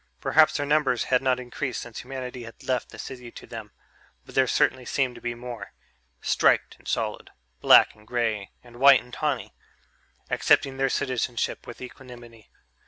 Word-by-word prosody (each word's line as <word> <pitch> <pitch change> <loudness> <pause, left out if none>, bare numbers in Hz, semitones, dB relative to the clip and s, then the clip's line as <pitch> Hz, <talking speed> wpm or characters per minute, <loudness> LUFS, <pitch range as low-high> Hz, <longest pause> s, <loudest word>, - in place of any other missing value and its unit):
Perhaps 155 0 +4
their 145 - -1
numbers 145 -4 +2
had 125 -1 +2
not 130 -1 +1
increased 125 +1 -4
since 120 -2 -9
humanity 125 -1 -6
had 115 -1 -11
left 125 -2 -1
the - - -12
city 125 -2 -8
to - - -11
them, - - -8 0.6
but - - -14
there 130 -1 +3
certainly 130 +1 +2
seemed 130 0 0
to - - -13
be 120 0 -3
more 120 -1 -8 0.5
striped - - +2
and - - -17
solid, - - -2 0.3
black - - +7
and 105 0 -21
grey 115 -5 -1
and 120 -1 -15
white 140 -1 +7
and 125 0 -18
tawny 145 -2 -2 0.8
accepting 135 -1 +3
their 135 0 +1
citizenship 125 -3 -2
with 120 - -10
equanimity. 120 -3 -12
125 Hz, 170 wpm, -26 LUFS, 120-135 Hz, 0.8 s, black